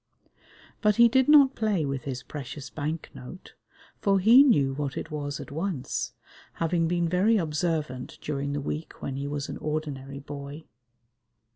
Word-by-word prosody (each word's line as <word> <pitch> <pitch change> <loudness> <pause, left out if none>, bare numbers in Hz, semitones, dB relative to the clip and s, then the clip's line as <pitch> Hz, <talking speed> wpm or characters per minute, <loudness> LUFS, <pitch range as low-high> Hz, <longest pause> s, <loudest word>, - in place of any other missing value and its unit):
But 210 -2 +3
he 235 0 +7
did 260 +3 +3
not 280 -3 +7
play 210 - 0
with 135 -2 -3
his 130 -2 -4
precious 140 0 -7
bank 155 +2 -4
note, 125 +9 -11 0.5
for 195 -1 +3
he 230 +8 +8
knew 145 - +4
what 140 -1 -3
it 165 - -5
was 145 -1 -4
at - - -8
once, 160 -4 -3 0.4
having 165 0 0
been 175 0 +1
very 190 +6 +3
observant 155 -6 -2
during 140 -1 -3
the 145 - -2
week 150 +3 -5
when 135 - -3
he 140 +1 -3
was 145 0 -3
an - - -6
ordinary 145 -3 -4
boy. 140 +2 -8
150 Hz, 160 wpm, -27 LUFS, 140-185 Hz, 0.5 s, he